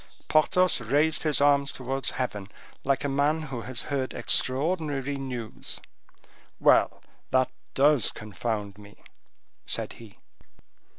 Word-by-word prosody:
Porthos 165 Hz, 0 st, +3 dB
raised 145 Hz, +7 st, +2 dB
his 155 Hz, -2 st, +3 dB
arms 140 Hz, 0 st, +4 dB
towards 135 Hz, 0 st, -2 dB
heaven, 105 Hz, -6 st, -3 dB, 0.3 s
like 135 Hz, 0 st, +1 dB
a -, -, 0 dB
man 145 Hz, +3 st, +1 dB
who 130 Hz, -5 st, -5 dB
has 120 Hz, 0 st, -5 dB
heard 135 Hz, -2 st, -3 dB
extraordinary 145 Hz, 0 st, 0 dB
news. 125 Hz, -5 st, -4 dB, 0.8 s
"Well, -, -, +4 dB, 0.3 s
that 130 Hz, 0 st, +2 dB, 0.2 s
does 145 Hz, -1 st, +4 dB
confound 105 Hz, -1 st, -4 dB
me," 105 Hz, 0 st, -16 dB, 0.6 s
said -, -, -1 dB
he. 110 Hz, -3 st, -14 dB
135 Hz, 115 wpm, -27 LUFS, 120-145 Hz, 0.8 s, arms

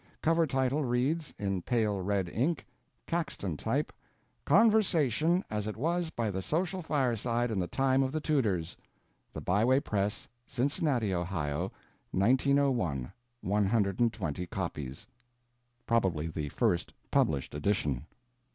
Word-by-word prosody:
Cover 165 Hz, 0 st, +3 dB
title 135 Hz, +2 st, +1 dB
reads, 135 Hz, +6 st, 0 dB
in 95 Hz, -2 st, -1 dB
pale 105 Hz, -3 st, 0 dB
red 95 Hz, -1 st, 0 dB
ink, 135 Hz, -, -1 dB, 0.4 s
Caxton 140 Hz, -, -2 dB
type, -, -, -1 dB, 0.5 s
Conversation 175 Hz, -, +4 dB
As 105 Hz, -1 st, -3 dB
It 110 Hz, -, -4 dB
Was 170 Hz, +5 st, 0 dB
By 115 Hz, -8 st, -2 dB
The 95 Hz, 0 st, -3 dB
Social 180 Hz, -, -1 dB
Fire 135 Hz, -7 st, +1 dB
side 120 Hz, +2 st, -1 dB
In 105 Hz, -, 0 dB
The 90 Hz, -, -1 dB
Time 135 Hz, +3 st, +2 dB
Of 130 Hz, -1 st, 0 dB
The 155 Hz, -, -1 dB
Tudors. 105 Hz, -, 0 dB, 0.6 s
[The -, -, -6 dB
Byway 115 Hz, +9 st, +3 dB
Press, 105 Hz, -6 st, -2 dB, 0.2 s
Cincinnati, 130 Hz, -, 0 dB
Ohio, 85 Hz, -2 st, -2 dB, 0.4 s
1901, 120 Hz, -, +2 dB, 0.3 s
120 100 Hz, -3 st, 0 dB
copies.] 75 Hz, -8 st, -5 dB, 0.8 s
Probably 95 Hz, -10 st, +1 dB
the 75 Hz, -2 st, -4 dB
first 85 Hz, +4 st, 0 dB, 0.2 s
published 70 Hz, -4 st, +1 dB
edition. 75 Hz, -3 st, -1 dB
115 Hz, 120 wpm, -30 LUFS, 95-140 Hz, 0.8 s, Conversation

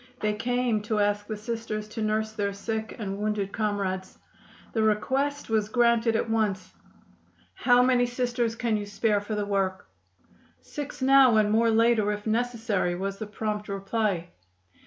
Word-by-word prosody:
They 210 Hz, 0 st, 0 dB
came 240 Hz, 0 st, 0 dB
to 215 Hz, -, +1 dB
ask 205 Hz, 0 st, +1 dB
the 215 Hz, -, -4 dB
Sisters 215 Hz, -1 st, -4 dB
to 220 Hz, +1 st, -5 dB
nurse 215 Hz, 0 st, 0 dB
their 200 Hz, -2 st, -2 dB
sick 220 Hz, +2 st, -4 dB
and 200 Hz, -2 st, -4 dB
wounded 210 Hz, -2 st, -1 dB
comrades. 195 Hz, -3 st, -2 dB, 0.6 s
The 225 Hz, -, +1 dB
request 265 Hz, +7 st, 0 dB
was 215 Hz, -2 st, 0 dB
granted 235 Hz, -1 st, +3 dB
at 225 Hz, -, 0 dB
once. 210 Hz, -4 st, -1 dB, 0.8 s
"How 245 Hz, 0 st, +4 dB
many 250 Hz, -1 st, +3 dB
Sisters 245 Hz, -2 st, -1 dB
can 230 Hz, -2 st, 0 dB
you 205 Hz, -1 st, -5 dB
spare 205 Hz, 0 st, +1 dB
for 210 Hz, +1 st, -4 dB
the 210 Hz, -1 st, -1 dB
work?" 195 Hz, -2 st, -1 dB, 0.7 s
"Six 290 Hz, -2 st, -7 dB
now 265 Hz, -3 st, +6 dB
and 210 Hz, -1 st, +3 dB
more 230 Hz, +1 st, +3 dB
later, 225 Hz, -2 st, +3 dB
if 210 Hz, 0 st, -5 dB
necessary," 225 Hz, -5 st, 0 dB
was 195 Hz, +2 st, -4 dB
the 215 Hz, -, -5 dB
prompt 210 Hz, 0 st, -4 dB
reply. 195 Hz, -3 st, -1 dB
215 Hz, 155 wpm, -27 LUFS, 205-235 Hz, 0.8 s, now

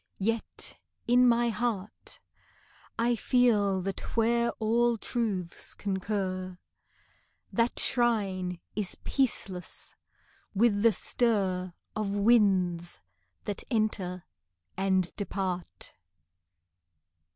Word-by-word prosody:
Yet 225 Hz, +3 st, -2 dB, 0.3 s
in 245 Hz, +1 st, +6 dB
my 235 Hz, 0 st, +3 dB
heart, 215 Hz, -2 st, -3 dB, 0.8 s
I 235 Hz, +1 st, +2 dB
feel 210 Hz, -6 st, +3 dB
that 195 Hz, +4 st, -5 dB
where 235 Hz, +1 st, +3 dB
all 235 Hz, +1 st, +2 dB
truths 200 Hz, -6 st, -3 dB
concur, 190 Hz, -2 st, -2 dB, 1.0 s
The 235 Hz, 0 st, +3 dB
shrine 195 Hz, -7 st, +1 dB, 0.2 s
is 205 Hz, -4 st, -2 dB
peaceless 200 Hz, -9 st, -2 dB, 0.6 s
with 205 Hz, -1 st, +3 dB
the 230 Hz, +1 st, +6 dB
stir 190 Hz, -8 st, 0 dB, 0.2 s
Of 205 Hz, -2 st, -1 dB
winds 195 Hz, -6 st, +3 dB, 0.5 s
that 205 Hz, -, -3 dB
enter 200 Hz, -6 st, -1 dB, 0.5 s
and 190 Hz, -2 st, +1 dB
depart. 185 Hz, -, -4 dB
205 Hz, 85 wpm, -29 LUFS, 185-235 Hz, 1.0 s, in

